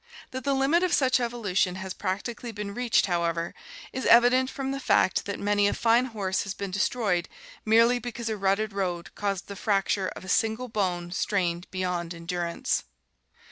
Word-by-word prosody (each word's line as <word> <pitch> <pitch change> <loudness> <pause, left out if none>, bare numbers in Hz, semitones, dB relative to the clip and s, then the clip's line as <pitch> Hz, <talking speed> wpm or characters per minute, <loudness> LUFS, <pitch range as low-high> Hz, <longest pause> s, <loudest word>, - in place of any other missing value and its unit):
That 260 0 -5
the 280 -1 +2
limit 275 +6 +3
of 365 -2 +1
such 260 -2 +3
evolution 210 -7 0
has 190 0 -5
practically 210 +5 -4
been 210 -1 -5
reached, 245 +1 +2
however, 170 -2 -1 0.4
is 260 - -2
evident 245 +2 +6
from 270 -1 -4
the 275 - -3
fact 190 -7 +2
that 200 - -4
many 205 0 +2
a - - 0
fine 235 +2 +3
horse 200 -6 -2
has 195 -1 -5
been 200 -1 -5
destroyed 195 -2 0 0.4
merely 230 +3 +5
because 240 -1 -5
a 220 - -1
rutted 200 +1 0
road 180 -3 -3
caused 200 -3 -2
the 200 - -8
fracture 195 -1 +1
of - - -9
a - - -10
single 225 +6 +1
bone 180 -5 -1
strained 180 -2 -1
beyond 180 -2 -3
endurance. 170 0 -2
205 Hz, 175 wpm, -27 LUFS, 185-240 Hz, 0.4 s, evident